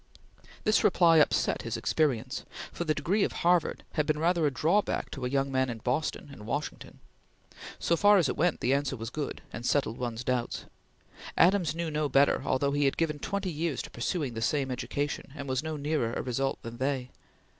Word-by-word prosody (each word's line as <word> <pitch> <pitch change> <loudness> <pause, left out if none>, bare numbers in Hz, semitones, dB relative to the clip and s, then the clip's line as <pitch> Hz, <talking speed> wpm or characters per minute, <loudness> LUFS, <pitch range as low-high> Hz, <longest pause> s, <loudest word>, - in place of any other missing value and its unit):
This 215 - +3
reply 165 -2 +5
upset 150 - +2
his - - -3
experience; 130 -4 0 0.3
for 170 - -4
the 155 -1 +1
degree 185 +8 +1
of - - 0
Harvard 175 -1 +2
College - - -15
had 150 - +3
been 155 - +1
rather 165 0 +2
a - - 0
drawback 170 +10 +1
to 135 -3 -5
a - - -1
young 135 0 0
man 130 -1 +1
in 115 - -4
Boston 130 +6 -2
and 105 -6 -11
Washington. 145 +6 -4 0.8
So 170 - +1
far 205 +3 +6
as 170 -6 +3
it 125 - -1
went, 170 +2 +1
the 125 - +2
answer 140 -1 0
was 115 +1 -6
good, 150 -2 -4
and 120 - -6
settled 125 -3 0
one's 120 -1 -3
doubts. 125 -1 -2 0.7
Adams 175 -4 +4
knew 170 -1 -2
no 150 -1 0
better, 140 +2 +4
although 140 +2 +1
he 145 0 +1
had 135 - +1
given 155 -3 0
twenty 200 +1 -2
years 155 -3 -2
to - - -10
pursuing 135 +1 -2
the 115 - -5
same 135 +2 0
education, 140 +2 -3
and 140 -2 -6
was 130 0 0
no 160 -1 -4
nearer 145 -5 -1
a - - -2
result 135 +2 -1
than 115 0 -7
they. 130 -1 -2
145 Hz, 205 wpm, -29 LUFS, 130-160 Hz, 0.8 s, far